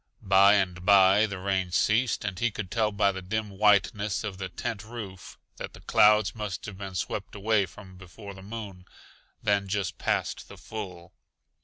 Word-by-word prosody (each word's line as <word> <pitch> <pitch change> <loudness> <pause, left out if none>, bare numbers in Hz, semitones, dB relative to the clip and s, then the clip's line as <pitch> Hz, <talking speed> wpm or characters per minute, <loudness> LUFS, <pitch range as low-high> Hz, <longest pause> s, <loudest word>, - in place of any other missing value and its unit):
By 100 +1 +6
and 90 -3 -1
by 100 +2 +6
the 100 -2 -6
rain 95 -1 -1
ceased 110 +5 +1
and 95 -3 -4
he 120 - +2
could 100 -3 -7
tell 110 0 +1
by 100 -1 +2
the 95 -1 -6
dim 105 +3 -3
whiteness 105 +1 +2
of 100 -3 -5
the 95 -1 -4
tent 100 +3 -5
roof 105 -5 -9 0.2
that - - -7
the - - -13
clouds 105 0 +4
must 105 -4 -5
have 100 -3 -8
been 95 -2 -7
swept 100 +3 -4
away 105 -1 +1
from 95 -3 -14
before 100 +2 -11
the 95 - -12
moon, 100 -3 -8 0.6
then 100 -1 +1
just 95 -2 -3
past - - -2
the - - -11
full. 90 -6 -8
100 Hz, 180 wpm, -27 LUFS, 95-105 Hz, 0.6 s, By